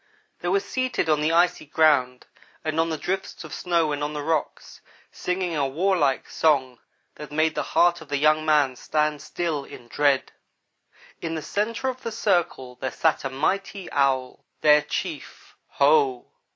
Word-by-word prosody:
They 175 - -5
were 195 +3 +3
seated 250 -3 -2
on 150 -1 +3
the 155 +2 +1
icy 175 -1 +2
ground 140 -5 +2 0.4
and 155 0 -1
on 165 0 +2
the 160 - -2
drifts 190 +6 -4
of - - -9
snow 170 -4 0
and 145 0 -2
on 150 +1 -3
the 150 -1 -4
rocks, 160 -1 -3 0.3
singing 180 -2 -2
a 140 -2 +1
warlike 150 -2 +1
song 130 -6 +1 0.3
that 150 - -10
made 155 +1 +1
the - - -1 0.2
heart 175 0 +4
of 160 - -11
the 145 - 0
young 155 +2 +3
man 150 -4 +3
stand 150 +2 -1
still, 165 -5 -3
in 120 -3 -12
dread. 140 -1 +1 0.9
In 165 -1 -3
the 155 - -4
centre 225 - -2
of 255 -1 -3
the 230 - -4
circle 175 - -1
there 130 - -1
sat 160 +3 0
a 135 - -2
mighty 190 +7 -2
Owl 135 -2 0 0.2
their 150 0 +6
chief. 295 - -6
Ho! 425 -5 +2
155 Hz, 170 wpm, -24 LUFS, 145-180 Hz, 0.9 s, their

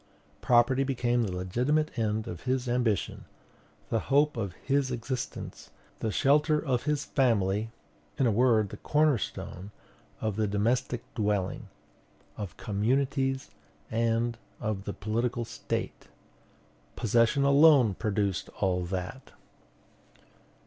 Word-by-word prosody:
"Property 125 +2 +4
became 120 -3 0
the 105 -5 -1
legitimate 125 +13 0
end 110 -1 -1
of 85 -1 -6
his 130 0 0
ambition, 120 -5 0 0.7
the 115 - +2
hope 145 +2 +3
of 100 -6 -3
his 140 +5 0
existence, 125 +1 -5 0.3
the 110 - -1
shelter 150 +5 +3
of 130 -5 -1
his 150 -1 0
family; 110 -5 +1 0.5
in 135 - +2
a 115 - +3
word, 110 -2 +3
the 105 - -8
corner 150 -2 +2
stone 95 0 -6 0.5
of 110 -2 -2
the 110 -1 +1
domestic 120 +4 0
dwelling, 105 -4 -1 0.7
of 100 -4 -7
communities, 130 +5 0 0.4
and 115 +1 0 0.2
of 105 -2 -3
the 100 - -3
political 115 +3 -2
State." 115 - -4 0.9
Possession 120 +5 +2
alone 140 -5 +6
produced 100 -2 -1
all 90 -2 +1
that. 95 +8 -5
115 Hz, 115 wpm, -29 LUFS, 105-135 Hz, 0.9 s, alone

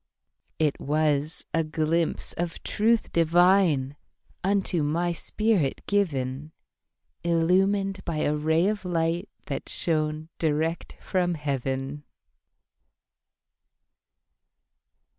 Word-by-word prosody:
It 150 -3 +1
was 150 +1 0
a 165 - +2
glimpse 160 +1 -1
of 170 -1 -4
truth 225 +2 +1
divineUnto 175 +1 +1
my 170 +4 0
spirit 190 -4 0
given, 150 -7 -1 0.7
Illumined 190 +4 +2
by 160 -3 -2
a 150 - +1
ray 160 +3 +2
of 210 +1 0
lightThat 170 +1 -3
shone 155 -1 +1
direct 160 +1 -1
from 180 -2 0
heaven. 135 -1 -3
165 Hz, 80 wpm, -26 LUFS, 150-180 Hz, 0.7 s, a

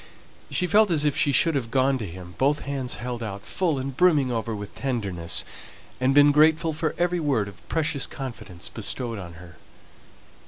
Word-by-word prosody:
She 180 - +1
felt 210 +3 +4
as 155 -3 +1
if 145 - +1
she 145 - +2
should 165 +4 +3
have 130 -5 -2
gone 135 +1 +2
to 110 - -4
him 90 0 -10
both 145 +2 +2
hands 135 -3 -3
held 120 -1 -5
out, 100 -3 -6
full 170 -6 0
and 135 0 -4
brimming 150 -6 +3
over 115 -1 -2
with 105 -1 -7
tenderness, 100 -11 -1 0.5
and 130 +2 +2
been 145 0 +7
grateful 160 +2 +4
for 155 +1 -2
every 175 0 +1
word 135 -10 0
of 100 - -14
precious 155 -3 -1
confidence 115 -9 -8
bestowed 115 0 -3
on 85 -3 -8
her. 85 -2 -14
135 Hz, 185 wpm, -25 LUFS, 110-150 Hz, 0.5 s, been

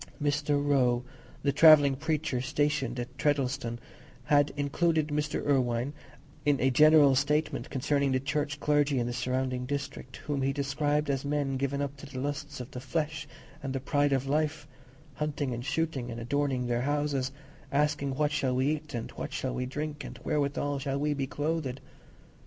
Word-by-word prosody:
Mr. 145 0 +1
Roe, 125 -4 +3 0.4
the 140 - +3
"travelling 145 -2 +7
preacher" 150 -3 -1
stationed 135 -2 0
at 120 - -6
Treddleston, 135 -4 0 0.5
had 145 +2 +3
included 155 +2 +1
Mr. 150 +1 -1
Irwine 125 -1 +1 0.5
in 145 -2 +2
a 130 +1 +3
general 150 0 +7
statement 150 +4 0
concerning 140 0 +1
the 130 - +2
Church 145 +2 -2
clergy 145 -2 +2
in 120 - +1
the 120 - -3
surrounding 125 0 -1
district, 140 -2 -5
whom 145 -2 -1
he 135 +1 +1
described 145 +1 0
as 135 -1 -1
men 140 -1 -1
given 140 +1 -1
up 140 0 -5
to 140 - -10
the 130 - -9
lusts 145 +1 -4
of 125 - -7
the 125 - -6
flesh 150 +2 -2 0.3
and 135 -2 -4
the 135 - -1
pride 145 +2 +1
of 135 -1 +1
life; 150 +1 -1 0.5
hunting 145 -3 -2
and 120 0 -4
shooting, 150 -6 -1
and 115 0 -5
adorning 130 +1 0
their 120 -1 0
own 125 - -2
houses; 145 -2 0 0.4
asking 140 -1 +1
what 150 +1 +1
shall 135 -4 0
we 130 +2 +2
eat, 150 -3 -10
and 115 - -4
what - - -6
shall 130 -1 -2
we 125 0 -2
drink, 150 +2 -4
and - - -8
wherewithal 145 -1 0
shall 135 0 -2
we 150 +1 +1
be 135 -2 -2
clothed? 145 -2 -2
140 Hz, 175 wpm, -29 LUFS, 130-150 Hz, 0.5 s, travelling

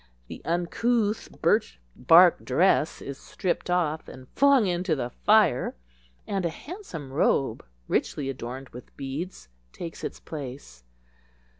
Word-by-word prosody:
The - - -8
uncouth 210 +6 0
birch - - +2 0.2
bark 170 +7 +6
dress 175 -3 +2
is 140 -1 -7
stripped 180 -1 -3
off 165 -3 0
and 130 -1 -11
flung 275 -5 +4
into 175 -2 0
the 125 -3 -3
fire, 210 - +3 0.5
and 195 -2 -2
a 170 - +1
handsome 165 - -8
robe, 135 -4 +1 0.2
richly 140 - -1
adorned 130 0 -6
with 125 - -13
beads, 140 - -5 0.2
takes 165 - -8
its - - -5
place. 130 - -8
165 Hz, 125 wpm, -26 LUFS, 135-185 Hz, 0.5 s, bark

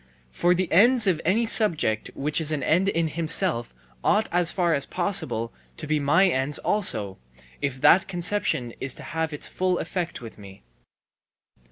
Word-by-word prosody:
For 175 - +1
the 185 0 -1
ends 230 +6 +4
of 180 -5 +1
any 215 +7 +1
subject 165 - +1
which 150 +3 -1
is 155 -1 -3
an 145 -3 -2
end 175 +8 +2
in 165 -3 0
himself 160 -4 -1 0.3
ought 215 +1 +2
as 175 0 +2
far 175 -3 0
as 140 -2 +1
possible 175 - -1 0.2
to 155 - -6
be 155 0 0
my 165 +7 +3
ends 140 -3 +1
also, 105 - 0 0.4
if 135 -2 -3
that 190 - +5
conception 175 - -2
is 135 -1 -2
to - - -11
have 160 0 -3
its 150 - -5
full 185 -1 -1
effect 170 0 -4
with 115 -3 -11
me. 100 -4 -14
165 Hz, 170 wpm, -24 LUFS, 140-185 Hz, 0.4 s, that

